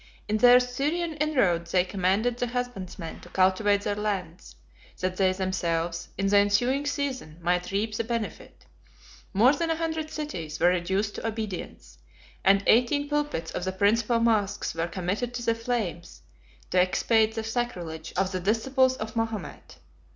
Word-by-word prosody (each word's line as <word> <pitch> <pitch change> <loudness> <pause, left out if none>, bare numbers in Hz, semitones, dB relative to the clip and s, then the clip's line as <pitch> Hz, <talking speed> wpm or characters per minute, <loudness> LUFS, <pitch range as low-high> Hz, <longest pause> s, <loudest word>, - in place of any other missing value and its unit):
In 215 - +1
their 245 +2 +8
Syrian 295 +7 -1
inroads 200 - +1
they 180 -1 +5
commanded 195 +6 0
the 245 - -1
husbandmen 220 -9 -5
to - - -14
cultivate 195 +2 +3
their 205 - -1
lands, 195 -5 -4 0.4
that 185 0 -2
they 190 -1 +3
themselves, 175 -3 -2
in 195 - -1
the 200 +1 +4
ensuing 245 +8 +2
season, 270 - -3
might 180 +1 0
reap 210 +3 -1
the 230 - -1
benefit; 230 -4 -5 0.7
more 240 +8 +5
than 335 +2 -1
a 325 - +2
hundred 320 -1 -3
cities 175 - -5
were 175 - +5
reduced 190 +4 0
to - - -4
obedience; 200 - -6 0.4
and 195 +1 +4
eighteen 285 +5 +3
pulpits 295 - -1
of - - -4
the 185 - -1
principal 215 +5 +2
moschs 215 -3 +1
were 165 +1 -2
committed 195 +8 -3
to 240 - -4
the 230 - +3
flames 225 -7 -4 0.5
to 180 - +4
expiate 220 +4 +2
the 225 - -2
sacrilege 180 -9 -4
of 190 0 +1
the 185 - -2
disciples 260 +7 +2
of 220 +1 -6
Mahomet. 225 -2 -4
210 Hz, 160 wpm, -27 LUFS, 185-245 Hz, 0.7 s, their